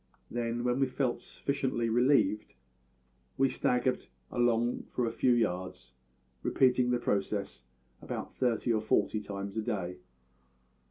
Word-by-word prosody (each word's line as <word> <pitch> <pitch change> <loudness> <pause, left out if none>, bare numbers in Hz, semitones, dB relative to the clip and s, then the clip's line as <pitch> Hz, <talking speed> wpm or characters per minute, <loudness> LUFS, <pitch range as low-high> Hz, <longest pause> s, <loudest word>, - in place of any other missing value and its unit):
Then, 120 0 -2
when 125 +1 +1
we 135 - +3
felt 130 -2 -1
sufficiently 130 -4 -2
relieved, 120 -2 +2 0.8
we 135 0 +4
staggered 125 +1 0 0.2
along 120 0 +1
for 125 - -1
a 115 - -1
few 125 - +3
yards, 95 -6 -1 0.5
repeating 125 -1 +3
the 125 - +3
process 100 - -1 0.4
about - - -5
thirty 120 -2 +1
or 110 - +1
forty 110 0 +1
times 100 0 -6
a - - +1
day. 95 -6 -3
120 Hz, 125 wpm, -31 LUFS, 105-125 Hz, 0.8 s, we